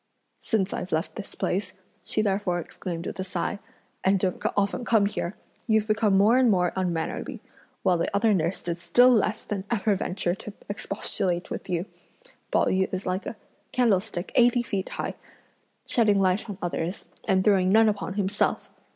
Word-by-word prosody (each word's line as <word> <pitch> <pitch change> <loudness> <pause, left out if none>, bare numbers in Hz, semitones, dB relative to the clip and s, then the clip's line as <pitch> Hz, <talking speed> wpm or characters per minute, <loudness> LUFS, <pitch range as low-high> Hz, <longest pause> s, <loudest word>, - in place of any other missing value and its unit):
"Since 200 -4 0
I've 180 - -4
left 160 +3 -1
this 210 - -7
place," 185 0 -1 0.3
she 215 - -1
therefore 195 -3 0
exclaimed 170 0 -6
with - - -5
a - - 0
sigh, 185 +2 -3 0.4
"and 195 +1 +4
don't 185 -1 -1 0.2
often 200 +4 +1
come 220 -4 +3
here, 200 -2 -2 0.3
you've 220 -2 +3
become 215 -2 +3
more 220 +6 +5
and 255 -2 +5
more 180 -4 +2
unmannerly; 175 -4 -2 0.4
while 180 -2 +3
the - - 0
other 210 +2 +3
nurse 170 0 -1
does 170 0 -3
still 245 +9 +5
less 215 -1 +1
than 195 -2 -4
ever 215 -2 +2
venture 185 -3 -1
to 200 +2 -8
expostulate 195 -3 -2
with - - -5
you; 175 0 -1 0.6
Pao - - +3
yü 190 0 +1
is 185 +1 -3
like 185 +2 -2
a - - -5 0.4
candlestick 205 -6 +1
eighty 245 0 +4
feet 195 -5 -3
high, - - -4 0.7
shedding 210 -4 +3
light 195 +4 +1
on 200 - -5
others, 175 +1 -3 0.2
and 190 -1 +3
throwing 190 -3 +4
none 220 +3 +6
upon 205 -2 -1
himself! 205 0 0
195 Hz, 170 wpm, -26 LUFS, 185-215 Hz, 0.7 s, none